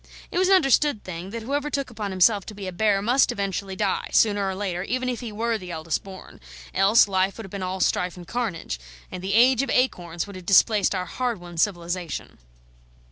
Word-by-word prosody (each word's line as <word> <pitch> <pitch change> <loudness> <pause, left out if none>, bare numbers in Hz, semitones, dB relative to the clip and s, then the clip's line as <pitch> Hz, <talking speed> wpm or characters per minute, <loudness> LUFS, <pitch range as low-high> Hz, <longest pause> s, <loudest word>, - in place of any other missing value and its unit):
It 355 - 0
was 370 - +3
an 390 - +7
understood 285 - +3
thing, 180 0 -7
that 230 +2 -6
whoever 285 +4 -2
took 275 -3 -3
upon 215 -3 -4
himself 195 +2 +3
to 215 - -8
be 200 -1 -7
a 185 - -4
bear 200 +1 +1
must 250 +4 +3
eventually 195 -1 -3
die, 195 0 -1
sooner 205 -3 +3
or 190 - -3
later, 185 -3 -3
even 255 +6 -2
if 245 - -3
he 235 -3 -6
were 225 +1 -1
the 180 -2 -9
eldest 160 -1 -3
born; 190 -1 -12 0.3
else, 205 +3 +5
life 190 0 0
would 225 - -7
have 195 - -12
been 200 - -5
all 185 +1 -3
strife 180 0 0
and 175 -1 -11
carnage, 195 - -3 0.3
and 180 - -7
the 195 +2 -1
Age 250 +2 +5
of 275 - -3
Acorns 175 -11 0
have 190 -3 -9
displaced 200 +2 +4
our 180 -1 -2
hard 240 +3 -2
won 175 -1 -11
civilisation. 175 -1 -2
200 Hz, 215 wpm, -24 LUFS, 185-235 Hz, 0.3 s, an